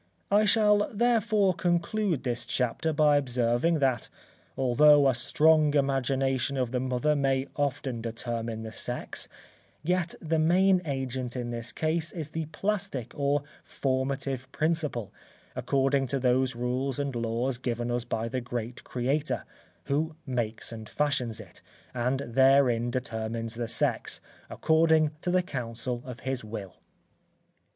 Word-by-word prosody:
I 210 Hz, +2 st, +5 dB
shall 210 Hz, -1 st, +4 dB
therefore 220 Hz, -3 st, +2 dB
conclude 175 Hz, -, 0 dB
this 120 Hz, -2 st, -2 dB
chapter 125 Hz, +6 st, 0 dB
by 150 Hz, -1 st, +4 dB
observing 125 Hz, +4 st, +1 dB
that 130 Hz, -5 st, 0 dB, 0.5 s
although 140 Hz, +2 st, +6 dB
a 135 Hz, -, +4 dB
strong 150 Hz, +4 st, +3 dB
imagination 135 Hz, -1 st, +1 dB
of 125 Hz, -3 st, -1 dB
the 125 Hz, -, 0 dB
mother 130 Hz, +4 st, +1 dB
may 135 Hz, -2 st, +1 dB
often 135 Hz, -4 st, -2 dB
determine 115 Hz, -1 st, -4 dB
the 110 Hz, -, -6 dB
sex, -, -, -4 dB, 0.5 s
yet 175 Hz, 0 st, 0 dB
the 160 Hz, 0 st, 0 dB
main 180 Hz, +3 st, +4 dB
agent 130 Hz, -3 st, -3 dB
in 120 Hz, -1 st, -3 dB
this 115 Hz, 0 st, -4 dB
case 160 Hz, +1 st, -1 dB
is 160 Hz, -4 st, -5 dB
the 160 Hz, 0 st, -4 dB
plastic 195 Hz, -, -2 dB
or 145 Hz, -1 st, +1 dB, 0.2 s
formative 135 Hz, -1 st, -2 dB
principle, 155 Hz, -, -1 dB, 0.4 s
according 135 Hz, 0 st, +1 dB
to 135 Hz, +2 st, -1 dB
those 125 Hz, 0 st, +2 dB
rules 125 Hz, +2 st, -1 dB
and 140 Hz, -3 st, -2 dB
laws 120 Hz, +2 st, -1 dB
given 120 Hz, -1 st, -2 dB
us 120 Hz, -1 st, 0 dB
by 115 Hz, -1 st, -2 dB
the 125 Hz, +2 st, -2 dB
great 120 Hz, 0 st, -5 dB
Creator, 135 Hz, +5 st, -1 dB, 0.4 s
who 155 Hz, +3 st, -1 dB
makes 120 Hz, -5 st, -2 dB
and 110 Hz, -1 st, -8 dB
fashions 130 Hz, -6 st, -1 dB
it, -, -, -12 dB, 0.3 s
and 125 Hz, +2 st, 0 dB
therein 125 Hz, -1 st, +4 dB
determines 115 Hz, -2 st, -3 dB
the 120 Hz, 0 st, -3 dB
sex, -, -, -1 dB, 0.3 s
according 160 Hz, -1 st, +3 dB
to 180 Hz, -, -2 dB
the 180 Hz, 0 st, +3 dB
council 120 Hz, -5 st, -4 dB
of 125 Hz, -2 st, -8 dB
his 130 Hz, -2 st, -3 dB
will. 105 Hz, -4 st, -7 dB
135 Hz, 135 wpm, -28 LUFS, 120-155 Hz, 0.5 s, although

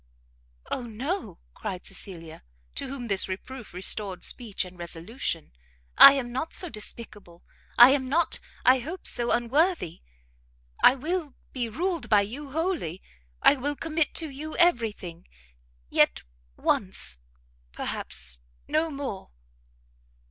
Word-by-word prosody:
"O -, -, -1 dB
no!" 250 Hz, -, -4 dB, 0.2 s
cried 185 Hz, -, -6 dB
Cecilia, 165 Hz, -5 st, -6 dB, 0.3 s
to -, -, -4 dB
whom 255 Hz, -3 st, -6 dB
this 195 Hz, -3 st, +2 dB
reproof 245 Hz, +6 st, -7 dB
restored 190 Hz, +1 st, 0 dB
speech 220 Hz, -6 st, -1 dB
and 180 Hz, 0 st, -12 dB
resolution, 170 Hz, -, -4 dB, 0.4 s
"I 275 Hz, -, +11 dB
am 255 Hz, -3 st, -3 dB
not 265 Hz, +6 st, -3 dB
so 360 Hz, -, 0 dB
despicable, 210 Hz, -, -8 dB, 0.3 s
I 240 Hz, +2 st, +10 dB
am 265 Hz, -2 st, 0 dB
not, 330 Hz, +3 st, +2 dB, 0.3 s
I 255 Hz, +1 st, +6 dB
hope, 325 Hz, +9 st, -7 dB
so 240 Hz, -1 st, +1 dB
unworthy! 260 Hz, -, +1 dB, 0.8 s
I 255 Hz, -, +8 dB
will 310 Hz, 0 st, -3 dB, 0.2 s
be 245 Hz, -3 st, -2 dB
ruled 340 Hz, -, -2 dB
by 210 Hz, -2 st, +6 dB
you 265 Hz, +8 st, -5 dB
wholly; 310 Hz, -, -2 dB, 0.4 s
I -, -, +7 dB
will 290 Hz, +3 st, -2 dB
commit 320 Hz, +1 st, 0 dB
to 320 Hz, -2 st, -1 dB
you 305 Hz, +3 st, -6 dB
every 245 Hz, -11 st, +4 dB
thing; 175 Hz, -4 st, -11 dB, 0.6 s
yet -, -, +3 dB, 0.3 s
once, 60 Hz, -, +2 dB, 0.5 s
perhaps, 60 Hz, 0 st, -2 dB, 0.3 s
no 315 Hz, +1 st, +1 dB
more!" 275 Hz, -9 st, -6 dB
245 Hz, 125 wpm, -27 LUFS, 195-300 Hz, 0.8 s, I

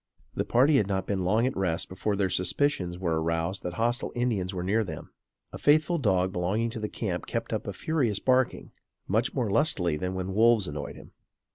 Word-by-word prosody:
The -, -, -2 dB
party 135 Hz, +5 st, +4 dB
had 105 Hz, -, +2 dB
not 95 Hz, -2 st, -1 dB
been 95 Hz, -2 st, -1 dB
long 110 Hz, +6 st, +2 dB
at 130 Hz, -, -1 dB
rest 90 Hz, -4 st, 0 dB
before 100 Hz, +2 st, -2 dB
their 100 Hz, -1 st, +1 dB
suspicions 90 Hz, -2 st, 0 dB
were 85 Hz, -3 st, -1 dB
aroused 85 Hz, +3 st, -1 dB
that 90 Hz, -, -4 dB
hostile 120 Hz, +3 st, 0 dB
Indians 110 Hz, -7 st, 0 dB
were 90 Hz, -2 st, -4 dB
near 105 Hz, +5 st, +1 dB
them. 80 Hz, -7 st, -8 dB, 0.4 s
A -, -, -8 dB
faithful 155 Hz, +3 st, +3 dB
dog 95 Hz, -7 st, +1 dB
belonging 100 Hz, +6 st, -1 dB
to 115 Hz, -, -6 dB
the 105 Hz, -1 st, -3 dB
camp -, -, -4 dB
kept -, -, -3 dB
up -, -, -3 dB
a -, -, -2 dB
furious 135 Hz, -11 st, 0 dB
barking, 130 Hz, +1 st, +1 dB, 0.4 s
much 110 Hz, +5 st, 0 dB
more 120 Hz, -7 st, 0 dB
lustily 90 Hz, -, +2 dB
than 90 Hz, +4 st, -3 dB
when 95 Hz, +1 st, -3 dB
wolves 110 Hz, -1 st, +4 dB
annoyed 75 Hz, 0 st, -5 dB
him. -, -, -13 dB
100 Hz, 205 wpm, -27 LUFS, 90-120 Hz, 0.4 s, party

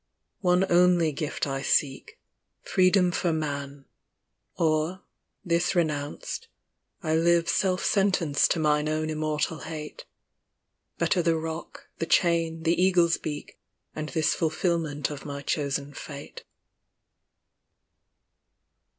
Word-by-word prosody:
One 180 Hz, 0 st, +3 dB
only 175 Hz, -2 st, +4 dB
gift 145 Hz, +1 st, -3 dB
I 135 Hz, -1 st, -3 dB
seek. 135 Hz, -1 st, 0 dB, 0.4 s
Freedom 185 Hz, -1 st, +3 dB
for 175 Hz, -1 st, 0 dB
Man; 140 Hz, -3 st, -4 dB, 0.7 s
or, 160 Hz, +3 st, 0 dB, 0.4 s
this 170 Hz, +1 st, +1 dB
renounced, 155 Hz, -, -2 dB, 0.6 s
I 155 Hz, -1 st, 0 dB
live 170 Hz, +1 st, +3 dB
Self 185 Hz, +1 st, +1 dB
sentenced 190 Hz, -7 st, +2 dB
to -, -, +1 dB
mine 150 Hz, -1 st, +2 dB
own 155 Hz, 0 st, -1 dB
immortal 155 Hz, 0 st, -1 dB
hate: 155 Hz, -2 st, -7 dB, 0.9 s
Better 180 Hz, -, +2 dB
the 165 Hz, -1 st, +2 dB
rock, 160 Hz, +1 st, -6 dB
the 165 Hz, -, -2 dB
chain, 165 Hz, -2 st, +2 dB
the 165 Hz, +1 st, +3 dB
eagle's 175 Hz, -3 st, +4 dB
beak, 150 Hz, -1 st, -6 dB, 0.4 s
And 155 Hz, 0 st, -4 dB
this 160 Hz, -2 st, +1 dB
fulfilment 160 Hz, -3 st, -1 dB
of 145 Hz, -1 st, -7 dB
my 140 Hz, -1 st, -6 dB
chosen 140 Hz, -1 st, -2 dB
fate. 140 Hz, 0 st, -9 dB
160 Hz, 110 wpm, -27 LUFS, 150-170 Hz, 0.9 s, only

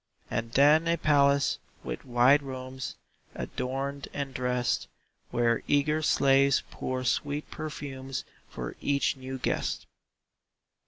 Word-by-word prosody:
And 115 Hz, +1 st, -2 dB
then 150 Hz, +4 st, +6 dB
a 170 Hz, 0 st, +2 dB
palace, 140 Hz, -2 st, +3 dB, 0.2 s
with -, -, -5 dB
wide 125 Hz, +3 st, +5 dB
rooms 130 Hz, -1 st, -6 dB, 0.4 s
Adorned 135 Hz, +2 st, -3 dB
and 140 Hz, -2 st, -3 dB
dressed, 125 Hz, -1 st, 0 dB, 0.4 s
Where 115 Hz, -1 st, +2 dB
eager 150 Hz, +2 st, +2 dB
slaves 140 Hz, -2 st, +4 dB
pour 130 Hz, 0 st, -3 dB
sweet 145 Hz, +4 st, -1 dB
perfumes 135 Hz, -4 st, -5 dB, 0.2 s
For 60 Hz, -1 st, -6 dB
each 140 Hz, -2 st, +1 dB
new 130 Hz, 0 st, -6 dB
guest. 125 Hz, -, -1 dB
135 Hz, 110 wpm, -29 LUFS, 130-145 Hz, 0.4 s, then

